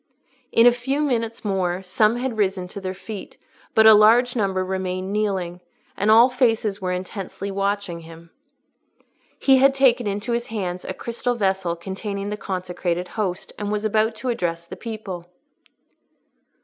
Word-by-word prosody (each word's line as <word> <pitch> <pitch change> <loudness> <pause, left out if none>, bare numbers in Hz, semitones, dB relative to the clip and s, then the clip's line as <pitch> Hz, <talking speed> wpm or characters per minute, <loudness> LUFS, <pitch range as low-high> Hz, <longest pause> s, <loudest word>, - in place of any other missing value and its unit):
In 230 - +5
a 245 - +9
few 265 +4 -2
minutes 230 -6 -1
more, 190 -2 -1
some 215 +4 +2
had 245 -1 -2
risen 190 -2 0
to 200 - -8
their 185 0 -4
feet, 210 0 -8 0.4
but 220 - +6
a 220 - +10
larger 235 +4 +5
number 190 -2 0
remained 185 0 -3
kneeling, 190 -4 -1 0.3
and 205 - 0
all 230 +3 +8
faces 225 -5 +1
were 185 -1 -1
intently 190 +2 -5
watching 200 -2 -2
him. 165 0 -13 1.1
He 270 -1 +5
had 270 +1 +5
taken 250 -4 +3
into 205 +3 -3
his 235 0 -1
hands 185 -5 -4
a 185 - -5
crystal 240 +1 -2
vessel, 190 -5 0
containing 200 +3 -5
the - - -1
consecrated 180 -2 -3
Host, 190 -5 -3
and 205 0 -3
was 210 0 -1
about 215 +1 +1
to 255 +3 -4
address 170 -8 -2
the - - -9
people. 205 -7 -7
205 Hz, 160 wpm, -23 LUFS, 185-230 Hz, 1.1 s, a